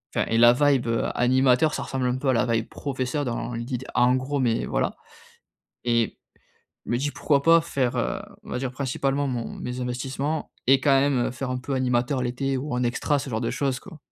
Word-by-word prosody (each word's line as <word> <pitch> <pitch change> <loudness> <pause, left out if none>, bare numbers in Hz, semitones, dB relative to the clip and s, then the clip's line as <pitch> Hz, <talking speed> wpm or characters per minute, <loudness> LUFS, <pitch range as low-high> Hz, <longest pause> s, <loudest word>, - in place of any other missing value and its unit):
enfin - - +2
et 115 - +1
la 120 +1 +7
vibe 140 -2 +2 0.3
animateur, 130 +4 +3
ça - - -2
ressemble 130 -1 -2
un 125 +1 0
peu 135 - 0
à 130 - +4
la 115 - +2
vibe 115 -2 0
professeur, 135 +1 -3
dans 120 0 -3
l'idée 120 +2 -3 0.2
en 125 0 +4
gros. 140 +2 -2
Mais 120 -3 +1
voilà - - -1 0.9
et 115 -1 +1 0.7
je - - -6
me 120 - +2
dis: 145 +3 -1
«Pourquoi 140 -2 +1
pas 165 0 +7
faire, 130 -5 -1 0.5
on - - -11
va - - -2
dire 130 -1 -3
principalement 135 +1 -1
mon 120 -3 -3
mes 125 +1 -5
investissements 135 +5 -3 0.2
et 135 0 +6
quand 135 0 +4
même, 135 -4 +1
faire 130 0 -4
un 125 - -1
peu 135 +2 -4
animateur 125 +1 +1
l'été 130 +2 -1
ou 145 +3 -4
en 125 - 0
extra?» 140 +4 0
ce 135 - -6
genre 110 +1 -1
de 115 - -1
choses 135 -3 -1
quoi. 175 -5 -12
130 Hz, 210 wpm, -25 LUFS, 120-140 Hz, 0.9 s, la